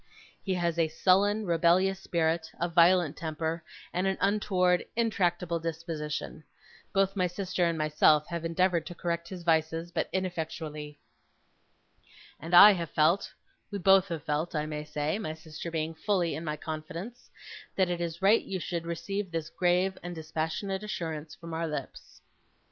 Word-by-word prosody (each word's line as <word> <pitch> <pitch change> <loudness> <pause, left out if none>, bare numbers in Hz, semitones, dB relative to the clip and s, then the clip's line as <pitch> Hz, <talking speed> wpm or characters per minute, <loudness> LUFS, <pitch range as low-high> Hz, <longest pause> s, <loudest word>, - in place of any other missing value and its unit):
He 190 -2 -1
has 170 -1 -1
a 165 - +3
sullen, 200 +6 +2
rebellious 175 +3 +3
spirit; 165 -3 0
a 175 - +1
violent 170 -2 +4
temper; 160 +1 -3 0.3
and 185 +2 0
an 190 - 0
untoward, 185 -3 +2
intractable 180 -7 0
disposition. 160 -2 -4 0.5
Both 195 0 +2
my 185 -2 +2
sister 180 0 -1
and 170 -1 0
myself 150 0 +4
have 170 -1 -4
endeavoured 170 0 +1
to 175 - -7
correct 170 0 -3
his 180 -2 -7
vices, 165 +1 +1
but - - -1
ineffectually. 160 -5 -4 1.4
And 165 +4 -1
I 205 +4 +11
have 170 -4 -2
felt 160 +5 +2 0.4
we 205 - -4
both 195 0 +5
have 165 -5 -5
felt, 155 +3 -2
I 150 0 0
may 150 -1 -5
say; 150 +5 -2
my 155 -8 -4
sister 160 +1 -8
being 160 0 -2
fully 175 0 0
in 160 - -5
my 155 -2 -3
confidence 165 +10 -7 0.5
that 185 -2 +2
it 175 -1 -2
is 170 +1 -4
right 210 +4 +6
you 190 - -4
should 170 -1 -4
receive 185 +4 -3
this 165 -1 -4
grave 180 +1 +1
and 175 0 -6
dispassionate 160 +5 -3
assurance 160 -7 -5
from 165 -1 -9
our 165 +1 -1
lips. 150 -4 -7
170 Hz, 160 wpm, -29 LUFS, 160-185 Hz, 1.4 s, I